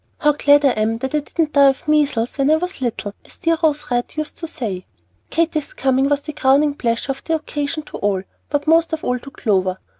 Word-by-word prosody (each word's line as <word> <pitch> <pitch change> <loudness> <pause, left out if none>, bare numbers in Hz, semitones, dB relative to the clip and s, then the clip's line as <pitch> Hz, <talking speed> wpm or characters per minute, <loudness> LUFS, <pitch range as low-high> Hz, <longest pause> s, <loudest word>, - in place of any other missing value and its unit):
How 295 - +3
glad 290 0 +4
I - - +6
am 220 0 0
that 265 +4 -4
I 300 - +3
didn't 305 +1 -2
die 280 -1 +7
of 270 +2 -3
measles 290 -6 +1
when 275 +1 +3
I 310 - +6
was 360 -1 -3
little, 225 -4 -3
as - - -16
dear 330 0 +1
Rose 300 -5 0
Red 245 0 -1
used 310 0 -3
to 330 - -5
say." 205 - -5 0.4
Katy's 320 -2 -1
coming 265 +1 +2
was 290 0 +1
the 305 +1 -7
crowning 285 +1 +3
pleasure 235 -1 -1
of 270 - -7
the 325 - 0
occasion 305 0 -3
to - - -9
all, 195 -2 0 0.3
but 290 -1 -1
most 325 +1 +3
of 315 - -3
all 250 0 0
to 275 - -11
Clover. 190 -9 0
285 Hz, 230 wpm, -20 LUFS, 245-305 Hz, 0.4 s, die